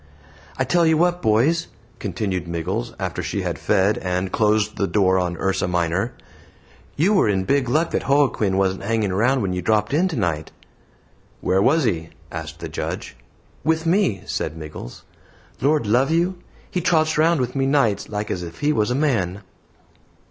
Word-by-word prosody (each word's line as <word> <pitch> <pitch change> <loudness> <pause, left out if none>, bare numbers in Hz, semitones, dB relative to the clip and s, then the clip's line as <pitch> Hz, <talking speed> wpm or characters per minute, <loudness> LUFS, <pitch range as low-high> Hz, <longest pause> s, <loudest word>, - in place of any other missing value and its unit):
"I 130 - +2
tell 170 +6 +2
you 160 -1 +4
what, 175 +1 +2
boys," 125 +10 +2 0.3
continued 95 -3 -3
Miggles 85 -7 -3
after - - -3
she - - -3
had - - -3
fed 95 +3 +2
and 90 0 -2
closed 110 0 +2
the 100 - 0
door 95 -2 +3
on 90 -1 -1
URSA 95 0 0
MINOR, 90 +5 0 0.8
"you 180 +8 +3
were 190 - +3
in 95 -2 +1
big 135 +3 +1
luck 155 +6 +1
that - - -2
Joaquin 130 -9 +2
wasn't 95 -1 +1
hanging 105 -2 0
round 125 +5 +2
when 95 -2 -1
you 90 - -2
dropped 105 +4 +1
in 170 +6 +3
tonight." 90 - -2 0.9
"Where 95 +1 +1
was 155 +9 +3
he?" 85 -8 -1 0.2
asked 80 -1 -7
the - - -4
Judge. - - -5 0.5
"With 160 +1 +1
me," 165 - +1
said 80 - -3
Miggles. 75 -6 -9 0.6
"Lord 145 -1 +2
love 125 +7 +3
you; 175 +3 +1 0.3
he 180 - -1
trots 155 -2 +2
round 165 0 +4
with 125 0 -2
me 135 -1 +1
nights 135 -8 +1
like 105 0 -3
as 90 - -2
if 85 -1 -9
he 150 +1 +2
was 105 -5 +1
a 125 - 0
man." 105 - 0
110 Hz, 175 wpm, -22 LUFS, 95-150 Hz, 0.9 s, you